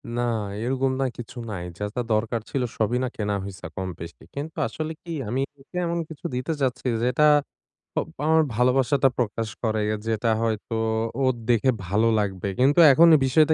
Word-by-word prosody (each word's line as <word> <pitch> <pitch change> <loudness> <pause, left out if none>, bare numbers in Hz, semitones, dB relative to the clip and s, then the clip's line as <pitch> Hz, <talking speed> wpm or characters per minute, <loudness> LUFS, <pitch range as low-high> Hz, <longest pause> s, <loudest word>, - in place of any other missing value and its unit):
না, 120 - 0 0.4
এরকম 130 +1 0
না - - +2
কিছু 120 +1 -9
নাই। 90 -3 -4
যা, 105 - -3
যা 125 - 0
দরকার 115 +1 0
ছিল 135 - -1 0.2
সবই 115 +3 +1
না - - 0
কেনা 105 -1 -1
হইছে 95 -1 -8
কম 95 -1 -3
বেশি। 85 0 -9
কিন্তু 150 +3 -5
আসলে 155 0 -4
কি, 170 - -8 0.2
আমি 130 +3 0 0.2
ওকে 160 +6 -10
এমন 170 0 -1
কিছু 160 +2 -11
দিতে 130 +6 -2
চাচ্ছি 130 -1 -1 0.2
যেটা 125 +5 +3 1.0
আমার 160 0 +5
ভালোবাসাটা 130 +2 +3
প্রকাশ 115 -1 -1 0.2
করে, 110 -1 +1 0.3
যেটা 115 +1 0
হয়তো 115 0 -2 0.5
ওর 130 - +3 0.2
দেখে 120 +2 +4 0.2
ভালো 105 +5 +2
লাগবে। 100 -1 -2
কিন্তু 140 +6 +4
এখন 165 +5 +7 0.2
বিষয়টা 155 +4 +4
125 Hz, 170 wpm, -25 LUFS, 110-135 Hz, 1.0 s, এখন